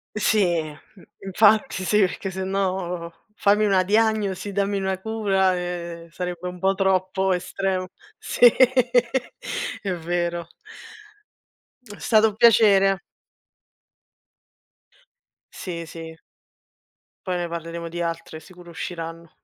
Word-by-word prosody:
Sì, 200 -6 +2
mhmm, 155 +5 -13 0.2
infatti 205 -1 +3
sì, 210 +3 +2
perché 190 0 0
sennò 185 -2 -2 0.2
"fammi 210 +1 +3
una 190 -2 +3
diagnosi", 210 -1 +1
"dammi 200 0 0
una 190 -1 -2
cura" 195 -3 +1
e 170 -1 -5
sarebbe 180 0 -5
un 180 0 -7
po' 190 +1 +2
troppo 190 0 +1
estremo. 185 +1 -2 0.3
Sì, 245 - +5 1.3
è 195 -3 -2
vero. 175 0 -2 1.4
È 210 -4 -12
stato 220 -1 +4
un 205 - -11
piacere. 200 -4 +5 2.5
Sì, 170 -3 -6
sì. 160 0 -9 1.1
Poi 180 - 0
ne 175 -1 -2
parleremo 170 0 -6
di 175 +1 -5
altre, 165 -1 -4
sicuro 175 +1 -15
usciranno. 165 -1 -7
185 Hz, 105 wpm, -23 LUFS, 170-200 Hz, 2.5 s, Sì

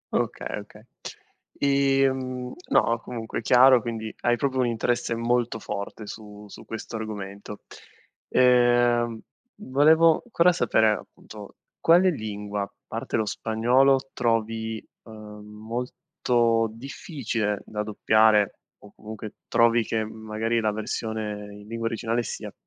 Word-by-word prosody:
Okay, - - -2
okay. 105 +1 -14 0.7
Ehm 135 -2 +1 0.2
no, 115 0 +3
comunque 115 -1 -5
è - - -7
chiaro, 130 0 +6
quindi 110 -1 -5
hai 120 0 +2
proprio 130 +1 -1
un 125 - +2
interesse 120 +1 -1
molto 120 0 0
forte 100 +1 -6
su 105 0 -10
su - - -12
questo 115 0 -6
argomento. 105 -1 -7 0.7
Ehm, 120 -2 +3 0.4
volevo 160 0 +4
cora 175 -1 +5
sapere, 110 -10 +2
appunto, 105 - -8 0.2
quale 180 +3 +5
lingua, 105 - -4 0.2
parte - - -3
lo 110 - 0
spagnolo, 130 +6 +2
trovi, 110 -1 -1 0.2
uhm, 105 -2 -11
molto 115 +1 -1
difficile 115 - -4
da 105 -1 -4
doppiare 110 0 +3 0.2
o 105 - -15
comunque 110 0 -9
trovi 115 0 +3
che 110 0 -1
magari 110 +1 -2
la 110 -1 +1
versione 105 -1 -4
in 105 0 -13
lingua 115 +1 -3
originale 115 +1 -1
sia - - -6
115 Hz, 120 wpm, -25 LUFS, 110-125 Hz, 0.7 s, chiaro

